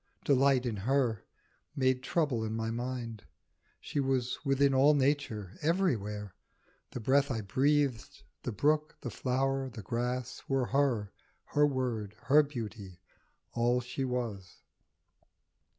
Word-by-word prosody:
Delight 135 -2 +4
in 115 -4 -2
her 120 0 0 0.5
made 130 -2 +2
trouble 135 -5 0
in 110 0 -3
my 115 0 -2
mind. 120 -2 -4 0.6
She 145 - -3
was 130 -2 0
within 135 -1 +3
all 140 +3 +5
Nature, 130 -9 0
everywhere. 110 - 0 0.6
The - - -6
breath 135 +5 +3
I 115 -4 -1
breathed, 135 +2 0 0.2
the - - -3
brook, 150 +7 +1
the 120 - -5
flower, 135 +2 0
the 115 -4 -9
grass, 125 +3 -3
Were 135 -2 +1
her, 125 -7 +1 0.4
her 145 0 +5
word, 120 -7 -2
her 150 +3 +6
beauty, 110 -10 -7 0.5
all 120 +1 +2
she 125 +2 -4
was. 115 -7 -4
125 Hz, 125 wpm, -31 LUFS, 115-140 Hz, 0.6 s, her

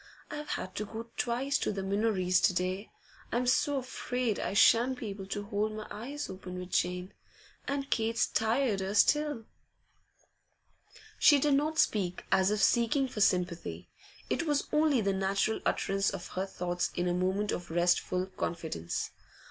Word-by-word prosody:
'I've 300 0 -6
had 185 - -6
to 210 - -2
go 230 +2 -8
twice 255 +3 0
to - - 0
the 195 -2 -4
Minories 195 -2 +1
to - - +4
day. 185 +4 -2 0.4
I'm 245 +2 0
so 275 +3 +2
afraid 250 -3 -2
I - - -2
shan't 240 +5 +5
be 230 -4 -5
able 195 -1 -7
to 205 +1 -3
hold 210 +1 -1
my 215 0 -6
eyes 275 +7 -5
open 185 -1 -8
with 180 0 -7
Jane, 180 +1 -1 0.5
and 275 0 -2
Kate's 225 0 +2
tireder 220 -4 0
still.' 295 0 +3 1.7
She 295 - +7
did 285 +1 +2
not 300 +3 +1
speak 185 - +1
as 190 0 +4
if 210 0 +1
seeking 240 +3 +3
for 225 -4 -5
sympathy 180 -3 0 0.4
it 335 - -1
was 290 -1 +1
only 300 -5 +3
the 195 -1 +1
natural 195 +3 0
utterance 195 0 +1
of - - -6
her 190 +1 -3
thoughts 175 -2 -2
in 175 - 0
a 175 - +1
moment 190 +3 0
of 175 - -4
restful 175 +2 +1
confidence. 165 - -4
210 Hz, 160 wpm, -30 LUFS, 185-250 Hz, 1.7 s, She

